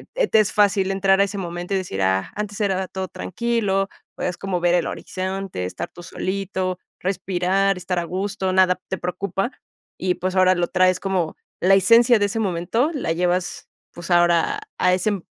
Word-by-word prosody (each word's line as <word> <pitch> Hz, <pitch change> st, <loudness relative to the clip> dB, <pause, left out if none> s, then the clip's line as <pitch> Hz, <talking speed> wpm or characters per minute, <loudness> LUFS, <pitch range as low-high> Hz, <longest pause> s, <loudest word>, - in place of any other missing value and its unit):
eh, -, -, +2 dB
te 220 Hz, -, +4 dB
es 210 Hz, -, +2 dB
fácil 200 Hz, -2 st, +3 dB
entrar 195 Hz, 0 st, +3 dB
a -, -, +6 dB
ese 200 Hz, +1 st, -6 dB
momento 175 Hz, 0 st, -4 dB
y -, -, +3 dB
decir: 175 Hz, -, -3 dB
"Ah, 95 Hz, 0 st, +1 dB
antes 205 Hz, -1 st, -4 dB
era 190 Hz, -2 st, 0 dB
todo 190 Hz, 0 st, -4 dB
tranquilo", 205 Hz, -2 st, -1 dB, 0.3 s
podías 180 Hz, -1 st, -3 dB
como 195 Hz, -2 st, -2 dB
ver 175 Hz, 0 st, +3 dB
el 175 Hz, -, +1 dB
horizonte, 190 Hz, -, -4 dB
estar 90 Hz, -, -5 dB
tú 175 Hz, -, -12 dB
solito, 185 Hz, 0 st, -3 dB, 0.2 s
respirar, 190 Hz, +1 st, 0 dB
estar 180 Hz, 0 st, -2 dB
a 170 Hz, -, -3 dB
gusto, 190 Hz, +1 st, -2 dB
nada 185 Hz, -1 st, +4 dB
te 190 Hz, -, -2 dB
preocupa. 195 Hz, +5 st, -2 dB, 0.5 s
Y, 180 Hz, -1 st, 0 dB
pues, 185 Hz, +1 st, -3 dB
ahora 185 Hz, 0 st, +5 dB
lo 175 Hz, -1 st, +1 dB
traes 185 Hz, 0 st, +3 dB
como 185 Hz, -5 st, -1 dB, 0.3 s
la 190 Hz, +2 st, +5 dB
esencia 230 Hz, +4 st, +6 dB
de 205 Hz, -, +3 dB
ese 220 Hz, +3 st, -3 dB
momento, 200 Hz, -, 0 dB
la 270 Hz, -, -2 dB
llevas, 180 Hz, +1 st, -1 dB, 0.2 s
pues, 175 Hz, +1 st, -9 dB
ahora 175 Hz, -, +3 dB, 0.2 s
a 180 Hz, 0 st, +4 dB
ese 185 Hz, +3 st, 0 dB
m 195 Hz, -4 st, -4 dB
190 Hz, 185 wpm, -22 LUFS, 180-195 Hz, 0.5 s, a